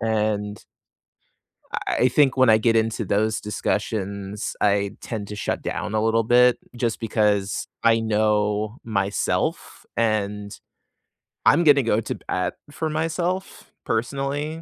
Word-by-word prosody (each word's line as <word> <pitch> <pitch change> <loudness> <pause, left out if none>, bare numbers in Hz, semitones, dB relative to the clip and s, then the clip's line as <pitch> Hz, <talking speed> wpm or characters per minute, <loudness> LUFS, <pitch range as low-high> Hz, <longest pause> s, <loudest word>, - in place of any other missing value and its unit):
and 105 -2 -1 1.4
eI 125 - +5
think 135 +1 +3
when 130 -2 +5
I 110 - +6
get 115 0 +2
into 115 0 0
those 110 +3 0
discussions, 100 -1 -3
I 100 -1 +2
tend 105 -4 -5
to 105 - -6
shut - - -2
down 105 - -3
a 110 - +2
little 115 0 +2
bit 125 +1 +5 0.2
just 115 -2 -1
because 105 -3 0 0.2
I 115 0 +5
know 105 0 0
myself, 100 -3 -1
and 105 -2 -1 0.9
I'm 170 - +5
gonna 145 -4 +6
go 110 -1 +2
to - - -4
bat 90 0 -1 0.2
for 160 +1 -3
myself 170 +4 -3
personally, 140 +7 -2
110 Hz, 125 wpm, -23 LUFS, 105-125 Hz, 1.4 s, I